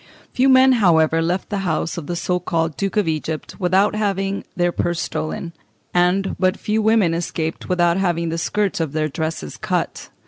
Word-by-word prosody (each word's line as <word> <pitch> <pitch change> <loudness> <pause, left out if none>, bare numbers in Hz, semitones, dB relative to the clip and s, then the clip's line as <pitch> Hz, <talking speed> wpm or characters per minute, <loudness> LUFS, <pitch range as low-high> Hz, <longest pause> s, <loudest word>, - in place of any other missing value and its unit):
Few 260 +2 +3
men, 260 0 +6
however, 165 -8 +3
left 175 +3 -1
the 205 - -1
house 170 -3 -1
of 165 -4 -6
the 175 - -2
so 180 +1 -1
called 165 -3 -1
Duke 195 +2 -2
of 205 -5 +2
Egypt 155 +2 -3
without 190 +2 +3
having 195 -2 -1
their 175 0 +1
purses 175 0 -1
stolen, 155 +2 -4 0.4
and 180 +2 +2
but 185 +1 +2
few 215 +1 -1
women 215 -6 +3
escaped 165 -1 -3
without 175 -1 +2
having 170 -3 0
the 165 +1 -2
skirts 205 +2 -1
of 160 -3 -2
their 155 0 0
dresses 155 - -4
cut. - - -3
175 Hz, 180 wpm, -21 LUFS, 165-195 Hz, 0.4 s, men